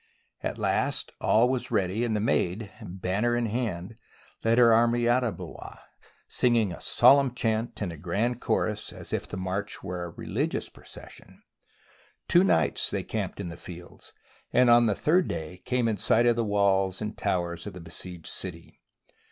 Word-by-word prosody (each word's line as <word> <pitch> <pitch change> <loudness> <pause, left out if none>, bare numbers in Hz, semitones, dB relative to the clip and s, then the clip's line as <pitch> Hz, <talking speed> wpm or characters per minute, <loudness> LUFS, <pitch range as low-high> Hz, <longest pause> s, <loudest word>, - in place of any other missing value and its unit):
At - - -3
last - - 0
all 115 +3 +4
was 130 -1 -1
ready 100 0 0
and 115 -2 0
the - - +1
Maid, 105 -1 0
banner 95 +6 -1
in 120 - 0
hand, 110 -3 -3 0.5
led 115 +1 +3
her 120 -2 +7
army 120 +1 +3
out 125 +2 +3
of 115 -4 -2
Blois, - - -9 0.5
singing 115 -5 +2
a 85 - -8
solemn 135 -2 +5
chant 115 0 -1
in 90 - -3
a 80 - -9
grand 105 +10 -1
chorus 105 0 -1
as - - -8
if - - -2
the - - -6
march 95 +2 -4
were 90 0 -4
a - - -6
re - - -10
ligious - - -2
procession. - - -14 0.8
Two 175 - +5
nights 80 - +2
they - - -2
camped - - -4
in 85 - -4
the 85 - -8
fields, 85 0 -11 0.4
and 125 -1 +5
on 120 0 +6
the 105 - +1
third 175 - +2
day 80 +3 -5
came 125 -2 +1
in 110 -2 0
sight 115 +5 +3
of 120 -1 +4
the 115 - 0
walls 100 -2 +1
and 105 0 -4
towers 85 -2 -2
of - - -6
the 90 - -9
besieged 85 0 -8
city. 85 -3 -7
105 Hz, 180 wpm, -27 LUFS, 90-120 Hz, 0.8 s, her